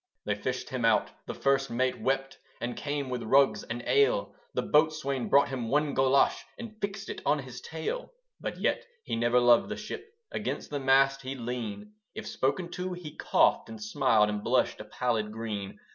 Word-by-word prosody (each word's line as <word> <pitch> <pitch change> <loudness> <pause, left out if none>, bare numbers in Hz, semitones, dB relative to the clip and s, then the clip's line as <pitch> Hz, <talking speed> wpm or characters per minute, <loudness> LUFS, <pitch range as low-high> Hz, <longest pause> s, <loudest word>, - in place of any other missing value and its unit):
They 105 - +1
fished 125 +5 -3
him 130 -2 -2
out; 115 -2 +3 0.2
the - - -4
First 135 0 +2
Mate 130 +2 0
wept, 135 0 -1 0.2
And 120 0 -3
came 140 -2 -3
with 125 -1 -2
rugs 135 +4 +4
and 120 +1 -5
ale: - - +3 0.2
The - - +1
Boatswain 150 -4 +1
brought 140 0 +5
him 125 -4 -3
one 145 +1 +2
golosh, 135 +1 +3 0.2
And 230 -2 -8
fixed 200 0 -3
it - - -6
on 150 - +3
his 130 -3 -8
tail. 160 - -4 0.3
But - - -4
yet - - 0 0.2
he - - -3
never 120 +2 +3
loved 120 -1 +5
the - - -4
ship; 445 - -7 0.2
Against 210 - -4
the 145 - -1
mast 135 0 +4
he'd 135 +1 -5
lean; 125 - -5 0.2
If - - -6
spoken 170 +6 -1
to, 180 0 -3
he 175 -4 -8
coughed - - +2
and 110 -1 -8
smiled, 110 -1 +3
And 105 0 -3
blushed 125 +2 +1
a 105 - -7
pallid 110 -1 -1
green. 105 -3 -5
135 Hz, 190 wpm, -29 LUFS, 120-150 Hz, 0.3 s, brought